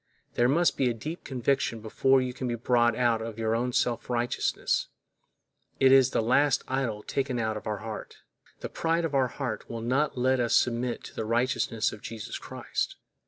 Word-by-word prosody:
There 120 +1 +3
must 170 +5 +3
be 130 -2 +2
a 120 - -2
deep 155 +10 -6
conviction 130 -2 0
before 130 +5 +2
you 125 -1 -3
can 130 0 -4
be 120 - -1
brought 120 0 +2
out 120 -2 +2
of 115 -1 -6
your 115 +2 0
self 120 0 0
righteousness; 120 0 0 0.9
it 135 0 +6
is 135 -1 +6
the 115 - 0
last 140 +4 +3
idol 125 -6 -2
taken 135 -2 -2
out 110 -2 -1
of 105 - -6
our 105 -1 -1
heart. 110 -1 -7 0.4
The - - -4
pride 165 +1 0
of 155 - -3
our 135 -2 +3
heart 125 -3 -5
will 115 -1 -5
not 130 +5 0
let 130 +1 +2
us 120 -1 +2
submit 120 0 +1
to - - -10
the - - -2
righteousness 115 0 0
of 105 - -10
Jesus 110 -2 -6
Christ. - - -4
120 Hz, 190 wpm, -28 LUFS, 115-135 Hz, 0.9 s, it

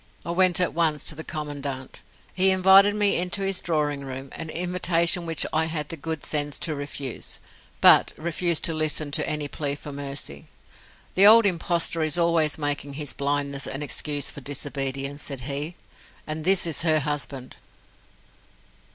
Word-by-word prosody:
I 170 - -3
went 185 0 +3
at 180 - +1
once 160 -3 +1
to - - +1
the 160 +1 -9
Commandant. 145 -4 -6 0.3
He 190 0 +4
invited 190 +2 +5
me 205 -1 +3
into 180 +3 0
his 195 -1 +2
drawing 150 -4 -2
room 135 0 -7
an 165 - -7
invitation 175 0 +1
which 165 -1 0
I 160 +1 +3
had 155 -2 -4
the - - -4
good 160 0 -6
sense 145 -1 -2
to 160 - 0
refuse 140 -3 -5 0.4
but - - +7
refused 170 +1 -1
to 165 - +3
listen 155 -1 -1
to - - -1
any 150 -1 -2
plea 145 0 -3
for 145 0 -10
mercy. 140 - -7 0.7
"The 195 +2 +6
old 225 +1 +8
impostor 170 -2 +1
is 155 0 0
always 165 -3 +1
making 145 -1 -3
his 145 -3 -2
blindness 140 0 -2
an 135 +2 -4
excuse 145 0 0
for 145 - -11
disobedience," 140 0 -4
said 140 -4 -4
he. 145 +6 -5 0.5
And 155 0 -6
this 190 -1 +4
is 165 -3 0
her 155 -2 +2
husband. 140 -3 -4
155 Hz, 165 wpm, -24 LUFS, 140-170 Hz, 0.7 s, old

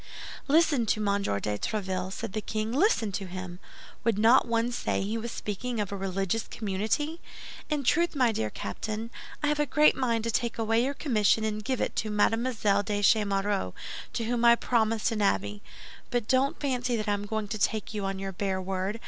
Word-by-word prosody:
"Listen 295 -5 +3
to 215 - +1
Monsieur 200 - 0
de 105 0 -2
Tréville," 190 -3 -2
said 215 0 -5
the 215 - -2
king; 215 +1 -3
"listen 265 - +2
to 195 0 -4
him! 185 -1 -7 0.4
Would 225 -3 +2
not 230 +4 +5
one 230 +1 +1
say 240 - -1
he 210 +3 -2
was 230 +1 -4
speaking 225 +4 -4
of 205 -2 -2
a - - -2
religious 195 +2 -2
community? 220 - -2 0.5
In 300 -2 0
truth, 340 +6 +2
my 250 -4 +3
dear 110 - -1
Captain, 215 - -5 0.3
I - - +3
have 300 0 0
a 295 - +2
great 300 +3 +5
mind 235 -4 0
to 230 - -1
take 235 0 -1
away 225 +1 +2
your 275 +2 -1
commission 220 -6 +2
and 215 -1 -2
give 260 +3 -1
it - - -1
to 215 - 0
Mademoiselle 210 -1 +2
de 205 0 -2
Chemerault, 200 - +2 0.4
to 230 - -1
whom 235 +1 -1
I 235 0 +8
promised 225 -1 +1
an 215 -2 -1
abbey. 100 - 0 0.5
But 245 -4 -1
don't 265 +2 +2
fancy 250 -3 0
that 215 -1 -3
I 205 - +2
am 205 0 -3
going 220 0 -2
to 215 0 -3
take 215 +1 0
you 210 -2 -3
on 195 0 -2
your 195 0 -4
bare 190 0 -2
word. 190 +3 -2
220 Hz, 200 wpm, -28 LUFS, 200-240 Hz, 0.5 s, I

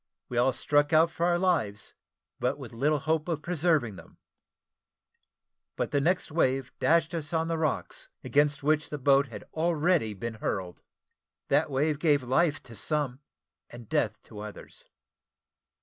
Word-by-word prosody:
We 120 - -4
all 130 +2 +4
struck 145 +3 +2
out 160 +1 +5
for 170 +1 0
our 175 -1 +3
lives, 150 - 0 0.5
but - - 0
with - - -9
little 145 +6 +1
hope 155 +3 -1
of 160 -3 -2
preserving 155 - +1
them; 80 - -15 1.6
but - - -2
the 145 - +2
next 175 +2 0
wave 135 -4 +1
dashed 165 +1 +3
us 160 -2 -4
on 160 0 +1
the 165 - 0
rocks, 155 -4 -2
against 145 0 +2
which 155 +1 +1
the 150 - -4
boat 140 0 +4
had 110 -4 -9
already 160 - +1
been 115 +4 -5
hurled. 90 -3 -3 0.7
That 150 +3 +3
wave 145 +2 0
gave 145 -5 +3
life 145 +4 +1
to 115 -2 -12
some, 145 -1 -1 0.5
and 120 -2 -11
death 105 +1 0
to 105 - -11
others. 105 0 -10
145 Hz, 155 wpm, -28 LUFS, 125-160 Hz, 1.6 s, out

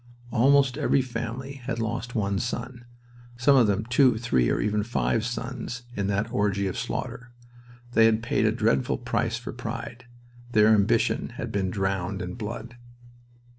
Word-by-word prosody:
Almost 135 +2 +4
every 135 - +2
family 125 +3 -5
had 115 - -2
lost 115 +2 -3
one 100 -3 0
son. 120 +1 -4 0.5
Some 140 +4 +4
of 125 -4 +5
them 100 +1 0
two, 125 0 +4
three, 65 - +1
even 105 0 +1
five 110 0 0
sons, 125 +1 -5
in 100 -1 -1
that 100 +3 -1
orgy 100 -4 +1
of 95 - -2
slaughter. 125 0 -4 0.6
They 115 -1 +5
had 115 0 +1
paid - - +1
a - - +3
dreadful 65 0 +1
price - - -1
for - - -7
pride. 120 +2 -6 0.5
Their 105 0 +6
ambition 105 -3 +2
had - - -4
been 95 -2 0
drowned 95 -1 -2
in 90 0 -5
blood. 115 +3 -6
115 Hz, 155 wpm, -26 LUFS, 100-125 Hz, 0.6 s, Their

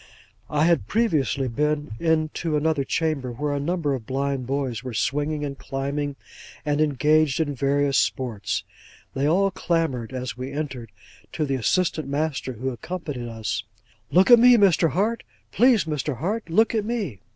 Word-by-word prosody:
I 150 +1 +2
had 170 0 +2
previously 155 - +1
been 150 +3 -1
into 160 -1 0
another 155 -1 +1
chamber, 145 -4 -1
where 145 +5 -2
a 140 - -1
number 155 -1 -1
of 120 -5 -5
blind 135 -1 -2
boys 130 -5 -2
were 125 -3 -6
swinging, 145 +6 -1
and 140 -1 -5
climbing, 140 +1 -3 0.5
and 150 0 +1
engaged 150 +1 +2
in 150 -3 0
various 140 +1 +2
sports. 120 -6 -1 0.5
They 135 +2 0
all 195 +5 +3
clamoured, 165 -10 -1
as 130 -1 -4
we 130 +2 -6
entered, 135 -6 -5 0.4
to 155 - -1
the 135 - -2
assistant 155 - 0
master, 140 -2 -2
who 130 +3 -3
accompanied 135 -1 -5
us, 110 -4 -3 0.5
'Look 185 +7 +4
at 240 - +10
me, 245 0 +7
Mr. 180 -5 +4
Hart! 215 +7 0 0.3
Please, 240 -4 +4
Mr. 150 -4 -2
Hart, 205 - -3
look 220 +8 +3
at 220 -2 +1
me! 205 - -3
145 Hz, 160 wpm, -24 LUFS, 135-165 Hz, 0.5 s, at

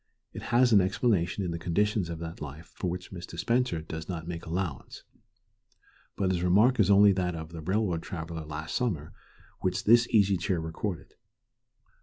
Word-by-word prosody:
It - - -7
has 120 0 +4
an 100 - +7
explanation 95 -1 0
in 85 - -2
the 85 - -4
conditions 95 +2 0
of 85 - -4
that 85 +1 -7
life 75 +3 -8
for 90 - -3
which 90 +1 -6
Mr. 85 -2 -8
Spencer 120 -4 0
does 80 +1 -7
not 85 -3 -5
make 85 -1 -6
allowance. 85 -5 -4 1.1
But 95 -2 0
his 90 -2 0
remark 105 +9 +4
is 100 -2 +4
only 100 0 +7
that 90 -2 -1
of 80 -1 -7
the 85 -1 -7
railroad 95 -1 0
traveller 80 -3 -6
last 75 +1 -6
summer 90 - -2 0.5
which 90 -1 -1
this 120 +2 +5
Easy 100 -3 +4
Chair 90 0 -1
recorded. 80 0 -5
90 Hz, 175 wpm, -28 LUFS, 80-100 Hz, 1.1 s, an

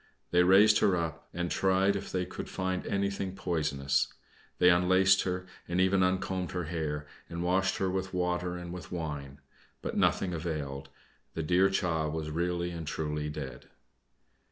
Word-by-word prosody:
They 90 - +5
raised 100 +4 +6
her 95 - +4
up, 80 -1 -4
and 85 0 -3
tried 95 +1 +3
if 100 - -5
they 90 -1 0
could - - -7
find 95 -1 -2
anything 100 -1 -1
poisonous. 75 -7 0 0.5
They 90 0 +6
unlaced 95 +2 +4
her, 90 0 -2 0.2
and 85 +1 -1
even 95 +1 +4
uncombed 95 0 0
her 90 -1 -1
hair, 75 -2 -3 0.2
and 85 +1 -4
washed 95 +2 +1
her 95 - 0
with 95 +1 -2
water 90 -1 -1
and 90 0 -7
with 90 -2 -8
wine. 75 -5 -5 0.4
But - - -3
nothing 90 -2 +2
availed: 75 -5 -4 0.5
the 80 - -2
dear 90 +5 +4
child 80 -5 0
was 80 -1 -3
really 85 +2 -1
and 85 -2 -6
truly 75 -1 -2
dead. 70 -4 -7
90 Hz, 160 wpm, -30 LUFS, 80-95 Hz, 0.5 s, raised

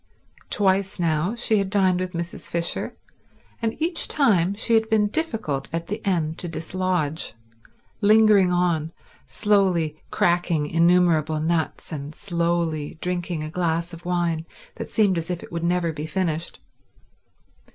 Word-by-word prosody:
Twice 195 -1 +1
now 165 0 +1
had 235 +2 -5
she 215 -3 +2
dined 190 -2 +2
with 185 0 -3
Mrs. 170 +1 -5
Fisher, 170 0 -2 0.6
and 225 -1 -2
each 325 +1 +1
time 200 - +2
she 230 +2 0
had 220 0 +3
been 220 -2 +3
difficult 220 - -2
at 165 0 -3
the 210 +5 -5
end 165 -5 0
to 175 - -4
dislodge, 165 -3 -2 0.7
lingering 210 -3 +5
on 170 -3 0 0.3
slowly 180 -7 +1
cracking 170 -3 +1
innumerable 165 -1 +3
nuts 160 +1 -1
and 150 0 -6
slowly 170 -4 -1
drinking 175 -3 -2
a 155 - -6
glass 170 0 -1
of 170 +1 -10
wine 170 -2 -1 0.3
that - - -6
seemed 200 -6 +2
as 165 +1 -6
if 175 -1 -3
it - - -12
would 170 -1 -3
never 170 -1 +1
be 150 +1 -5
finished. 165 -1 -2
175 Hz, 140 wpm, -24 LUFS, 160-195 Hz, 0.7 s, lingering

